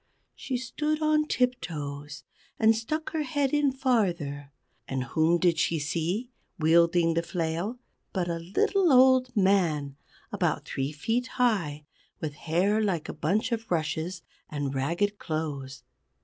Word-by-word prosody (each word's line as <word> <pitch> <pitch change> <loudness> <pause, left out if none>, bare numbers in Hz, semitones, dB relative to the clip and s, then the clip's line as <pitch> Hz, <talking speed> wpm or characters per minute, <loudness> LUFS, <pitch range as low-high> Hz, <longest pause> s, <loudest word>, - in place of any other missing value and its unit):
She 255 - -3
stood 300 +5 -2
on 305 -1 +2
tiptoes, 150 - -2 0.3
and 225 0 +5
stuck 305 +8 -3
her 315 - -1
head 285 -2 0
in 295 -2 +3
farther, 175 - 0 0.4
and 130 -1 -2
whom 160 +5 +2
did 170 -2 +2
she 165 - +1
see, 170 - -2 0.3
wielding 165 +1 +4
the 165 - +1
flail, 170 +6 -2 0.3
but 180 -3 -1
a 170 -1 -2
little 360 - +2
old 260 0 +6
man, 165 -8 +2 0.3
about - - -1
three 135 +1 -2
feet 225 +12 -1
high, 170 - +1 0.3
with 155 -2 -4
hair 180 +8 +1
like 185 -7 -1
a - - -3
bunch 190 +11 0
of 225 -1 -3
rushes, 165 +2 -2 0.3
and 145 -2 -3
ragged 170 +10 0
clothes. 145 -4 -4
175 Hz, 135 wpm, -27 LUFS, 155-245 Hz, 0.4 s, old